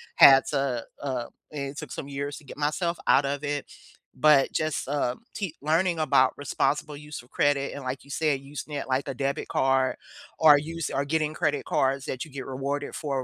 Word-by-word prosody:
had 135 -1 +9
to, 135 -5 0 0.2
uh 130 -4 -2 0.3
it 140 -1 -5
took 150 -4 -7
some - - -5
years 140 +1 -4
to - - -13
get - - -10
myself 160 +4 0
out 140 - +5
of 140 +1 -2
it, 145 -1 -2 0.5
but 140 0 +5
just, 155 -4 -1
uh, 140 -3 0 0.2
te 200 - -2
keep 165 - -12
learning 170 +3 +2
about 140 -4 +4
responsible 145 +1 -1
use 150 -1 -8
of 125 - -22
credit 140 -1 +1
and 140 - -7
like 130 +1 -4
you 140 - -19
said, 150 -2 +1
using 145 +2 -8
it 140 - -3
like 130 +2 0
a 135 - -2
debit 140 +1 -2
card 135 0 +2 0.4
or 155 -2 +8
use 165 +2 -4
or 140 - 0
getting 155 +1 0
credit 150 -3 0
cards 135 0 +1
that 130 - -3
you 155 - -14
get 135 -1 -6
rewarded 140 +2 -3
for 140 -4 -2
140 Hz, 205 wpm, -27 LUFS, 135-150 Hz, 0.5 s, had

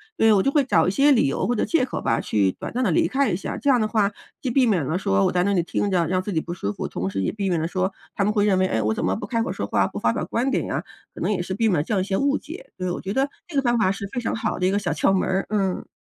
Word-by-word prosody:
对， 225 - +4
我 200 - +4
就 275 - +2
会 290 -1 +3
找 165 -11 +2
一 - - +2
些 280 +7 +4
理 245 - +4
由 135 - -1
或 245 - +1
者 230 - 0
借 330 -6 +2
口 - - -5
吧， 115 - +1
去 100 -3 +1
短 - - -7
暂 250 - -1
地 220 - +2
离 165 - +3
开 275 +3 +1
一 180 - 0
下， 190 - -4
这 285 - 0
样 255 -3 +5
的 215 - +1
话 215 -3 +2 0.3
既 260 - -2
避 255 +1 +3
免 195 -9 +2
了 160 +6 -1
说 95 - +1
我 - - +2
在 180 0 +2
那 200 - +1
里 180 - +3
听 200 +4 -1
着 175 -3 +2
让 185 +2 +1
自 205 - -5
己 160 - +1
不 170 - -6
舒 100 - -3
服， - - -4
同 90 - -4
时 95 0 -3
也 - - 0
避 200 -2 -2
免 175 -2 +1
了 160 - -1
说 185 +2 -1 0.2
他 200 - +1
们 205 - +2
会 205 -2 +2
认 200 -3 +3
为， 185 - +3
诶， 110 - 0
我 110 +1 +1
怎 - - -3
么 - - +1
不 - - -6
开 230 -2 0
口 - - -3
说 - - -4
话， - - +2
不 - - -5
发 - - +2
表 - - -2
观 245 +4 -1
点 - - 0
呀？ - - -2 0.3
可 - - -11
能 - - 0
也 205 - 0
是 180 +2 -4
避 225 +4 +1
免 195 - +2
了 - - 0
这 220 - -3
样 200 - +2
一 - - -2
些 195 -1 -1
误 280 0 +2
解， 320 +6 -10
对， 185 -1 -2
我 175 - -3
觉 190 +1 -4
得 270 +3 +1 0.2
这 340 - -10
个 - - +4
方 240 -2 +1
法 215 -4 +3
是 200 0 -5
非 255 - -1
常 230 - -2
好 220 - -2
的 180 - 0
一 185 - +3
个 200 - +1
小 - - -2
窍 - - +2
门 190 - +1
儿， 190 +1 0
嗯。 195 -3 -1
200 Hz, 385 characters per minute, -23 LUFS, 180-235 Hz, 0.3 s, 样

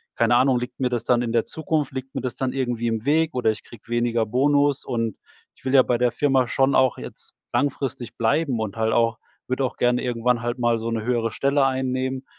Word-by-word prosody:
keine 120 - +3
Ahnung, 130 0 +3
liegt 125 +1 -7
mir 130 - +1
das 120 -2 -2
dann 120 0 +2
in 120 -1 -2
der 115 -1 +2
Zukunft 155 -2 -2
liegt 130 0 -7
mir - - -2
das 125 -2 -4
dann 130 -1 -1
irgendwie 120 -3 -1
im 115 -1 -1
Weg 160 +2 +2
oder 125 -3 +2
ich 110 - -8
krieg 120 - -16
weniger 120 -1 +1
Bonus.“ 140 +4 +2
Und 115 -4 -2 0.4
ich - - -23
will 130 - -1
ja 135 - +8
bei 120 - +1
der 120 0 +2
Firma 135 -3 +2
schon 135 +3 +2
auch 130 -1 +3
jetzt - - -9 0.2
langfristig 135 -4 -2
bleiben 130 +2 +1
und 110 -1 -4
halt 110 0 +1
auch 115 -1 +2 0.3
würd 130 +1 -2
auch 130 - -1
gerne 125 0 +2
irgendwann 120 -1 0
halt 120 +1 -2
mal 120 -1 +2
so 115 +1 -3
'ne 110 -1 -2
höhere 115 -1 0
Stelle 140 +2 +2
einnehmen. 130 0 -1
125 Hz, 230 wpm, -23 LUFS, 115-135 Hz, 0.4 s, ja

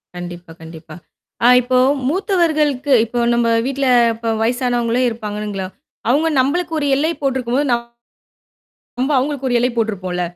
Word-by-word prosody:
கண்டிப்பா, 175 -1 -8
கண்டிப்பா. 160 -1 -11 0.5
ஆ - - +7
இப்போ 255 +1 0 0.3
மூத்தவர்களுக்கு 310 - +1
இப்போ 240 +2 -4
நம்ம 235 0 +1 0.2
வீட்ல 275 0 -2 0.3
இப்ப 230 +1 -7
வயசானவங்களே 245 0 0
இருப்பானுங்களா, 210 -3 -5 0.4
அவுங்க 310 +6 +2
நம்பளுக்கு 325 +6 0
ஒரு 285 - -1
எல்லை 310 +4 0
போட்டு 270 -1 0
இருக்கும்போது, 255 +4 -1 1.1
நம்ப- 260 +4 -5
அவுங்களுக்கு 270 0 -2
ஒரு - - 0
எல்லை 250 +1 +1
போட்ருப்போம்ல. 185 -5 -2
245 Hz, 130 wpm, -18 LUFS, 215-280 Hz, 1.1 s, ஆ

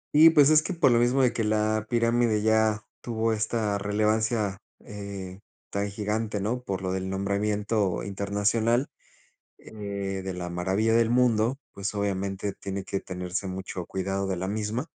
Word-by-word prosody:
Y 160 +2 +9
pues, 150 -2 +6
es 155 0 +6
que 180 +3 -4
por 135 - +4
lo 120 - +4
mismo 125 +3 +3
de 125 - +3
que 115 - -1
la 110 0 +1
pirámide 115 -2 +2
ya 110 0 +2 0.2
tuvo 115 -1 0
esta 105 -1 -1
relevancia, 105 0 0 0.3
eh, 100 -2 -7 0.3
tan 100 0 -1
gigante, 105 +1 -2
¿no?, 115 +5 -1
por 95 -5 -4
lo 95 - -1
del 95 0 -2
nombramiento 100 0 0
internacional, 105 +5 +1 0.7
eh, - - -15 0.5
de 95 -1 -4
la 90 -1 -4
maravilla 95 +6 +1
del 115 0 +4
mundo, 120 0 +3
pues, 100 +1 -4
obviamente 100 0 -2
tiene 95 0 -5
que 95 +1 -3
tenerse 90 +1 -4
mucho 95 -1 -5
cuidado 95 +1 -2
de 95 - -1
la 95 +2 -3
misma. 110 +6 -2
105 Hz, 160 wpm, -27 LUFS, 95-115 Hz, 0.7 s, Y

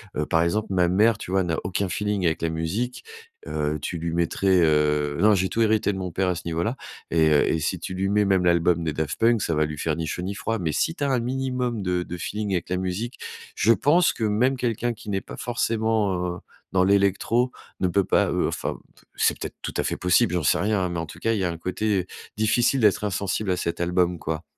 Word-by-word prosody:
heu, 75 - -1
par 80 - +2
exemple, 105 +6 0
ma 90 -2 +2
mère, 105 +5 +3
tu - - -8
vois, 95 0 +2
n'a 85 -2 -1
aucun 95 +1 -1
feeling 105 0 -1
avec 80 -1 0
la 85 - +1
musique. 90 +10 -3 0.4
Heu, 75 +1 -1
tu 85 - -3
lui 85 0 -3
mettrais, 90 +2 +2
heu, 75 -2 +2
non 105 +3 +5
j'ai 95 0 0
tout 115 - -1
hérité 110 -2 +2
de 95 - -5
mon 95 -1 -3
père 95 +3 0
à 90 - 0
ce 85 - -7
niveau 85 0 -1
là, 115 +7 -1 0.4
et 80 -1 +4
heu, 75 - +4
et 80 - +1
si 85 +3 -2
tu 90 - -6
lui 95 +1 -1
mets 105 +1 +3
même 95 -2 +2
l'album 85 0 +3
des 80 - -1
Daft 75 -1 -3
Punk, 115 -1 +3
ça 85 - 0
va 75 0 +2
lui 75 0 -6
faire 75 +1 -1
ni 80 -1 -3
chaud 90 - -3
ni 95 +3 -4
froid, 115 +2 -2
mais 80 -4 -1
si 165 - 0
tu 145 - -4
as 140 - +1
un 130 - +2
minimum 125 -2 -2
de 90 -2 -1
de 90 - -7
feeling 105 +3 -3
avec 90 -3 -1
la 90 - 0
musique, 95 +7 -3 0.4
je 115 - +3
pense 165 +8 +3
que - - -5
même 115 +6 +2
quelqu'un 120 -1 -1
qui 110 -1 -11
n'est 95 -1 -1
pas - - -10
forcément, 110 -4 0 0.2
heu, - - -11 0.3
dans 90 -1 +4
l'électro, 100 +5 +2 0.3
ne 95 - +3
peut 100 +3 +2
pas, - - +2
heu, - - +1
enfin - - -3 0.4
c'est - - +2
peut-être - - -6
tout - - -5
à - - +1
fait - - -2
possible, 90 -1 +3
j'en 90 -2 0
sais - - +3
rien 105 0 +1
hein, 90 - 0
mais 85 -1 -3
en 80 - -3
tout 75 - -12
cas, 115 - 0
il 110 - -1
y 95 - 0
un 85 -2 -2
côté 95 +2 -1 0.3
difficile 120 +4 +2
d'être 105 -2 +3
insensible 100 0 -1
à - - +2
cet 85 -1 -3
album 90 0 +1
quoi. 80 +1 -4
95 Hz, 250 wpm, -24 LUFS, 85-110 Hz, 0.4 s, non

